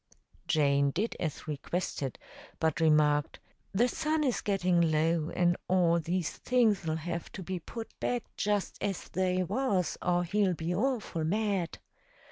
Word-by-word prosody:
Jane 140 -2 +3
did 205 +11 -1
as 160 -2 -4
requested, 145 -3 -3 0.4
but 160 -1 +1
remarked, 150 -2 +3 0.3
"The 230 +6 +3
sun 310 +3 0
is 255 -5 0
gettin' 180 -4 +2
low, 160 +1 +1
and 175 -1 +2
all 175 -2 +3
these 170 +1 -1
things'll 215 -10 +2
have 170 +1 -4
to 190 - -6
be 185 +1 -3
put 225 +6 -7
back 245 -3 -1
just 205 -1 -1
as 195 -3 -3
they 185 0 +1
was 195 -2 0
or 175 0 +2
he'll 190 0 +1
be 165 +2 -2
awful 215 -6 -1
mad." 195 0 0
180 Hz, 140 wpm, -30 LUFS, 160-205 Hz, 0.4 s, Jane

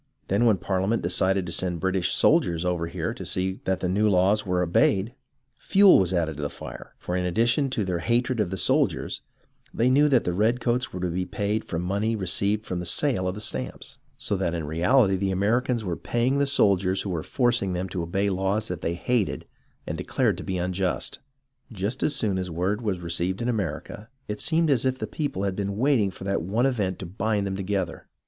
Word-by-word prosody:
Then 100 +5 +2
when 110 -4 +4
Parliament 95 +4 -1
decided 95 +2 +1
to 85 - -6
send 90 0 -2
British 95 0 0
soldiers 85 0 +3
over 90 -2 -1
here - - -3
to - - -8
see 95 +1 -2
that 95 -1 0
the 90 - 0
new 105 +4 +2
laws 100 +2 +2
were 90 -1 +1
obeyed, 95 +5 +2 0.5
fuel 195 -1 +6
was 95 -2 +1
added 80 -4 0
to - - -5
the 75 - -2
iire; - - -9
for 90 - -4
in 90 - 0
addition 115 - +1
to 115 -6 -1
their 90 -2 -1
hatred 120 +6 0
of 105 -4 +1
the 95 - -4
soldiers, - - 0 0.5
they 125 +3 +2
knew 145 +3 +5
that 130 -4 +4
the 90 - -1
redcoats 120 +5 +1
were 90 - -6
to 90 - 0
be 90 +2 -2
paid 105 +1 -2
from 85 +1 -3
the - - -4
money 105 +4 0
received 100 +2 -1
from 90 - -3
the 90 - -5
sale 105 - +1
of 90 - -2
the 105 - -7
stamps, - - -5 0.2
so 105 - -1
that 90 -3 -1
in 80 -2 -3
reality 95 - +3
the 95 +1 -1
Americans 115 +5 +1
were 90 -4 -2
paying 125 +8 0
the 140 - +2
soldiers 95 -8 +2
who 100 - -3
were 85 -3 -2
forcing 120 - +1
them 90 +1 -2
to 95 -1 -4
obey 95 +4 -1
laws 100 +3 0
that 90 -2 -4
they 85 0 -1
hated 110 +4 -1 0.4
and - - -4
declared - - +1
to - - -7
be 95 - -3
unjust. 90 +1 -2 0.5
Just 110 +5 -3
as 150 - +1
soon 105 -8 0
as 90 -1 -3
word 90 +6 -1
was 100 -6 -1
received 85 +2 -1
in 120 - -2
America, 105 0 -3 0.2
it 105 0 -3
seemed 160 -1 +2
as 130 -5 +3
if 130 0 0
the - - -3
people 145 -11 -3
had 100 -2 -1
been 100 0 -3
waiting 125 -5 +3
for 95 - -10
that 100 -1 -1
one 105 +9 0
event 105 -9 0
to 95 - -7
bind 105 +3 -1
them 95 -1 -2
together. 95 -3 -3
95 Hz, 220 wpm, -25 LUFS, 90-115 Hz, 0.5 s, fuel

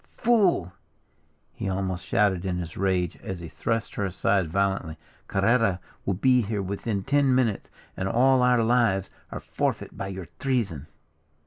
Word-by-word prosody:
"Fool!" 195 - +2 0.8
he - - -4
almost 95 -2 -2
shouted 100 -5 +1
in 90 -2 -2
his 85 -2 -5
rage, 90 -3 0
as 95 -2 -6
he 85 - -7
thrust 115 +6 -2
her 100 - -2
aside 95 0 +1
violently, 95 -2 -1 0.3
"Carrera 100 -1 +2 0.3
will 100 - +1
be 125 +5 +4
here 105 -2 -2
within 100 +1 -3
ten 140 +1 +3
minutes, 115 -6 0 0.3
and 95 +1 -2
all 130 +4 +4
our 125 -2 +4
lives 110 -5 +2 0.2
are - - -5
forfeit - - -3
by 95 - -4
your 95 -2 -6
treason." 105 - -1
100 Hz, 150 wpm, -26 LUFS, 95-120 Hz, 0.8 s, be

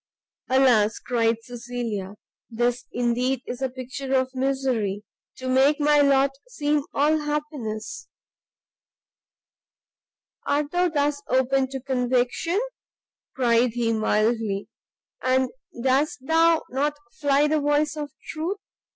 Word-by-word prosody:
"Alas," 245 -5 +4
cried 230 -2 0
Cecilia, 235 -5 -5 0.3
"this 240 +2 -1
indeed 245 +2 0
is 245 +1 -6
a 265 - 0
Picture 260 +1 -4
of 260 0 +1
Misery 255 -7 -1 0.3
to 260 - -6
make 270 +4 +4
my 295 0 +4
lot 275 -1 +4 0.2
seem 300 -10 0
all 305 +2 +2
happiness!" 295 -8 -4 2.4
"Art 290 0 0
thou 355 0 +2
thus 290 -2 0
open 260 +1 +2
to 270 0 -4
conviction?" 255 +6 0 0.8
cried 240 -2 +3
he, 230 -1 0
mildly; 215 -1 0 0.5
"and 260 0 +2 0.3
dost 265 +2 +1
thou 325 +1 +4
not 290 +3 0 0.2
fly 285 0 +3
the 310 +1 +2
voice 295 +1 +1
of 295 -1 -4 0.2
truth! 330 +6 -3
260 Hz, 110 wpm, -24 LUFS, 240-290 Hz, 2.4 s, Alas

